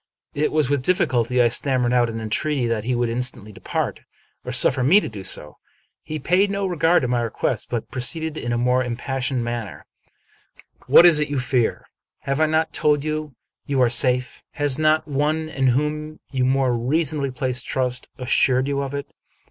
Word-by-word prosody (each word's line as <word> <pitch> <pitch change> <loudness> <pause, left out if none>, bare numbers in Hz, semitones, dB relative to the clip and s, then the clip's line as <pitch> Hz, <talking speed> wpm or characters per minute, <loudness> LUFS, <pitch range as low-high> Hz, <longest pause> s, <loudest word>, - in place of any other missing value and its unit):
It 150 +1 0
was 155 -3 +1
with 140 0 0
difficulty 125 - +1
I 120 - +3
stammered 125 0 +1
out 120 -1 +3
an 115 0 -5
entreaty 125 +5 -1
that 115 -2 -2
he 125 0 0
would 120 0 0
instantly 115 -3 -2
depart, 100 - -4 0.4
or - - -5
suffer 130 -1 +5
me 170 +11 +6
to - - -5
do 105 -4 -8
so. 75 -5 -4 0.4
He 155 - -6
paid 180 +7 +2
no 200 0 -2
regard 175 -3 +2
to - - 0
my 120 -1 0
request, 115 -2 -2
but 120 -2 -4
proceeded 150 +5 -1
in 120 -6 -4
a 120 - 0
more 125 +1 +2
impassioned 130 +1 -3
manner: 115 -5 -5 0.3
— - - -37
" - - -26
What 175 - +7
is 165 -3 +6
it 150 - -1
you 145 - -2
fear? 125 -2 -1 0.4
Have 140 +2 -2
I 155 - +4
not 160 +1 0
told 150 -2 +1
you 155 -3 -4 0.3
you 140 -2 0
are 125 -2 +3
safe? 125 -1 +2
Has 145 -2 -1
not 155 0 +2
one 155 +2 -1
in 135 -4 0
whom 150 +4 -1
you 130 -2 0
more 130 -1 +1
reasonably 140 +3 -1
place 130 0 -3
trust 125 0 -3
as 125 -1 -7
sured 130 -1 +3
you 140 0 -1
of 140 0 -4
it? 140 - -4
130 Hz, 195 wpm, -22 LUFS, 125-150 Hz, 0.4 s, What